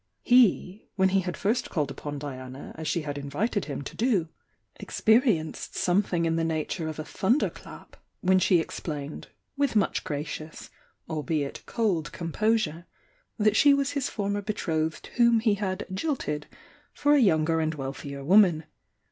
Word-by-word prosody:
He, 230 -5 +3
when 190 -2 +3
he 195 +1 +3
had 180 -2 -4
first 220 +5 0
called 150 -5 -1
upon 145 +1 -6
Diana 130 -2 -7
as 160 -1 -6
she 165 +1 0
had 145 -1 -4
in 140 0 -7
vited 205 - -1
him 140 -1 -5
to - - -8
do, 210 -9 +1 0.5
experienced 220 - +1
something 180 -2 +1
in 165 0 +1
the 165 - +1
nature 160 +1 -2
of 155 - -5
a 155 - -4
thunder 230 - +1
clap, - - -13 0.3
when 185 0 +4
she 180 -1 +4
explained, 150 -2 -5 0.3
with 280 -4 0
much 205 - +1
gracious, 150 +1 -6 0.4
albeit 155 -2 -2
cold 190 -10 0
composure, 175 -1 -1 0.5
that 215 -1 +3
she 285 +3 +6
was 280 0 0
his 280 -2 -1
for 205 -3 -3
mer 205 0 -1
betrothed 160 -6 -2
whom 235 -1 +5
he 220 -2 +2
had 195 -2 -3
''jilted" 190 - -2 0.5
for 290 0 +2
a 295 - +5
younger 165 - +3
and 160 0 -1
wealthier 140 0 -6
woman. 175 -1 +5
175 Hz, 160 wpm, -27 LUFS, 155-215 Hz, 0.5 s, she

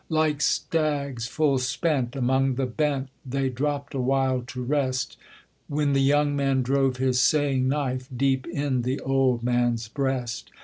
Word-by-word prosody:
Like 155 -2 +1
stags 140 -8 0
full 140 -1 +1
spent, 130 0 -1
among 130 0 +1
the 135 +1 0
bent 135 +1 -1
They 135 0 -1
dropped 140 +2 -3
a 135 - -2
while 130 0 +1
to 125 -1 -5
rest; 130 -2 -1 0.5
When 145 -1 0
the 135 - +3
young 145 +1 +3
man 135 -2 +1
drove 135 0 +1
his 130 -1 +1
saying 140 -4 +2
knife 130 -3 -2
Deep 130 0 +1
in 140 -5 -1
the 130 +3 -2
old 130 -3 +1
man's 120 -2 +1
breast. 125 -3 -2
135 Hz, 150 wpm, -25 LUFS, 125-140 Hz, 0.5 s, the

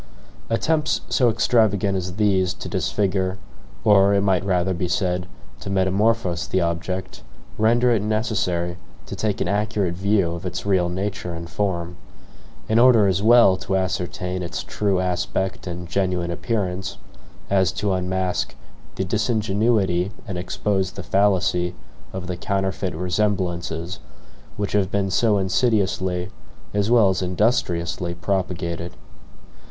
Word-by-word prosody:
Attempts 150 +7 +1
so 125 -3 +3
extravagant 105 -4 +2
as 90 -1 -3
these 95 -4 +2
to - - -7
disfigure 95 -2 0 0.5
or, 100 -1 +5
it 100 - +3
might 95 -3 +2
rather 95 -1 +1
be 90 +1 -2
said, 90 0 -1 0.3
to - - -7
metamorphose 95 -2 +1
the 95 - +1
object, 90 +2 -3 0.4
render 120 +3 +4
it 115 -4 +2
necessary 100 -5 -1 0.3
to - - -6
take 105 -3 -1
an - - 0
accurate 105 -2 0
view 95 -1 +1
of 85 +2 -6
its 90 0 -4
real 95 -3 +2
nature 95 -1 -3
and 85 -1 -8
form: 90 -3 -2 0.7
in 110 +1 +3
order 120 -4 +6
as 95 -1 +1
well 115 -3 +6
to 95 - -2
ascertain 90 0 -2
its 85 - -4
true 100 -3 0
aspect 90 +1 -2
and 85 0 -5
genuine 90 -1 -1
appearance, 95 -1 -2 0.5
as 95 -2 +3
to 105 -2 -1
unmask 90 0 -1 0.4
the 95 - -1
disingenuity 105 -3 +1 0.2
and 100 - -4
expose 95 +2 -1
the 100 - -7
fallacy 90 -2 +1 0.4
of 95 -1 -5
the 90 0 -3
counterfeit 95 0 -2
resemblances 90 -1 -1 0.6
which 100 -1 -2
have 100 -3 +1
been 100 -1 -1
so 105 +1 +3
insidiously, 95 -2 0 0.4
as 105 +1 +1
well 115 -5 +5
as 95 -1 0
industriously, 90 - 0
propagated. 90 -2 -2
95 Hz, 135 wpm, -22 LUFS, 90-105 Hz, 0.7 s, order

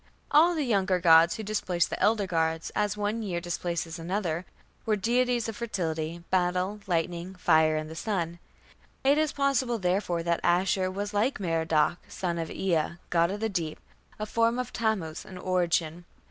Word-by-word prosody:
All 330 +4 +5
the 310 - 0
younger 195 -5 +2
gods, 165 -1 +6
who 220 - -5
displaced 185 -5 0
the - - -3
elder 215 -2 +3
gods 160 -2 -1
as 210 0 0
one 210 +2 -1
year 185 -5 -2
displaces 170 -1 -3
another, 175 -1 -2 0.4
were 220 -2 +1
deities 240 +3 +1
of 225 - -4
fertility, 170 -7 -3
battle, 185 +2 +1
lightning, 175 +1 -2
fire, 160 -3 +3
and 155 0 -2
the 160 - -9
sun; 170 -3 -2 0.6
it 280 +3 +4
is 310 -1 +1
possible, 270 -4 +1
therefore, 180 -3 0
that 170 0 +1
Ashur 185 +2 +2
was 200 +2 -4
like 215 +6 +1
Merodach, 165 -3 +1
son 170 -2 -3
of 165 - -3
Ea, 170 -4 0 0.2
god 170 0 +3
of 205 +2 -4
the 225 - +1
deep, 165 -6 -3 0.4
a 215 - -3
form 230 +2 +1
of 250 - -4
Tammuz 195 -8 -1
in 185 - -10
origin. 175 -2 0
185 Hz, 170 wpm, -28 LUFS, 170-215 Hz, 0.6 s, gods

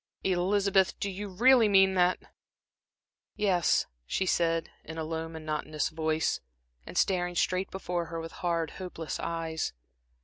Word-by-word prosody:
"Elizabeth, 190 +1 +2
do 200 - -2
you 205 +2 -5
really 230 +4 +5
mean 195 -1 +5
that?" 180 0 +3 1.2
"Yes," 185 -5 +2 0.2
she 190 - 0
said, 165 -2 +1
in 160 0 -8
a 160 - -2
low, 160 +1 -3
monotonous 155 -1 -3
voice, 160 0 0 0.5
and - - -7
staring 180 -2 +1
straight 185 +2 +1
before 180 -2 -3
her 165 0 -5
with 165 0 -6
hard, 170 -3 0
hopeless 175 -4 -6
eyes. 165 -1 -2
175 Hz, 135 wpm, -29 LUFS, 165-190 Hz, 1.2 s, really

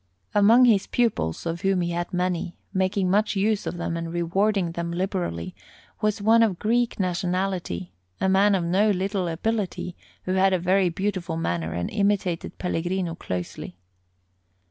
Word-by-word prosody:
Among 225 +5 +6
his 215 -5 +3
pupils, 215 - 0
of 170 +1 -3
whom 195 -2 +2
he 175 0 -1
had 175 0 -3
many, 180 -1 -2 0.2
making 190 -1 +1
much 210 +2 +2
use 210 +1 +1
of 175 - -3
them 170 -1 -3
and 165 0 -4
rewarding 180 +2 +1
them 170 0 -4
liberally, 175 - -2 0.5
was 210 -1 0
one 225 +2 +5
of 210 -6 +2
Greek 235 +3 0
nationality, 180 - -2 0.3
a - - +1
man 195 +2 +4
of 180 - 0
no 190 +5 +2
little 190 -1 0
ability, 180 0 -2 0.3
who 185 - -2
had 190 0 +3
a - - +4
very 185 +1 +2
beautiful 185 -2 -2
manner 85 - -2
and 85 +1 -3
imitated 200 -4 0
Pellegrino 180 0 -2
closely. 90 - -6
185 Hz, 155 wpm, -25 LUFS, 170-200 Hz, 0.5 s, Among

